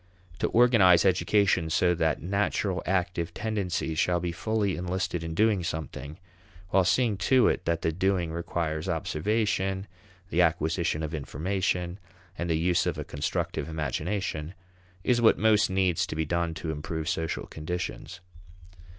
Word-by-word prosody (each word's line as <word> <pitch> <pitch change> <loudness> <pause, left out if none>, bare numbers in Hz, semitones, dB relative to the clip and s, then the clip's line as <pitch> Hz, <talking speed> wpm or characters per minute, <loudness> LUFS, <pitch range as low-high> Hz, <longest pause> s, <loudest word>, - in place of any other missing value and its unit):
To - - +1
organize 110 -8 +5
education 95 -2 +2
so 90 +2 +3
that 80 -2 0
natural 100 0 0
active 90 -2 -1
tendencies 95 -7 -2
shall 90 -1 +2
be 85 0 -2
fully 105 +1 -1
enlisted 90 -1 -2
in 80 0 -5
doing 105 -2 +3
something, 80 -3 -5 0.5
while 95 +1 +4
seeing 110 +3 +2
to 130 -2 +6
it - - 0
that 85 -1 -1
the 80 - +2
doing 90 -1 0
requires 85 0 -3
observation, 95 +3 -1 0.5
the 90 - +3
acquisition 80 -1 +1
of 80 +1 -4
information, 90 +4 -2 0.4
and 85 -1 -3
the 80 - +2
use 85 0 +2
of - - -1
a - - -3
constructive 85 +1 -3
imagination, 80 +3 -3 0.5
is 120 -1 +2
what 115 - +5
most 110 -1 +4
needs 95 -3 +1
to - - -5
be 80 0 -1
done 85 0 -1
to 80 - -4
improve 80 +1 -4
social 80 0 -2
conditions. 85 +3 -5
90 Hz, 145 wpm, -27 LUFS, 80-95 Hz, 0.5 s, to